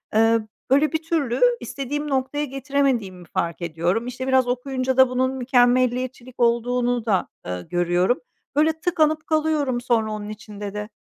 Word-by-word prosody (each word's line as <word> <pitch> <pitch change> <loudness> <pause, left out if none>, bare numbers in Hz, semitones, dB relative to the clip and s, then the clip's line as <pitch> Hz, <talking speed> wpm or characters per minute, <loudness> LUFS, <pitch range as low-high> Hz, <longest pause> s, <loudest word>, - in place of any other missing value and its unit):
ııı, 225 0 +3 0.2
böyle, 285 +3 +4
bir 320 0 -2
türlü 315 -7 -1 0.2
istediğim 290 +2 -4
noktaya 275 +2 -1
getiremediğimi 265 -9 -1
fark 170 +1 -2
ediyorum. 170 +7 -1
İşte, 250 +1 -5
biraz 260 -1 +3
okuyunca 255 +1 -1
da 260 -1 +7
bunun 255 +1 +1
mükemmeliyetçilik 250 0 +1
olduğunu 240 0 +1
da, 195 -5 +1 0.2
ııı, 90 0 -5
görüyorum. 175 +6 +1 0.4
Böyle, 315 +2 +2
tıkanıp 315 -3 +1
kalıyorum 305 -5 +1
sonra 230 -3 +1
onun 210 -1 -5
içinde 205 -1 -7
de. 210 0 -5
250 Hz, 140 wpm, -23 LUFS, 215-275 Hz, 0.4 s, da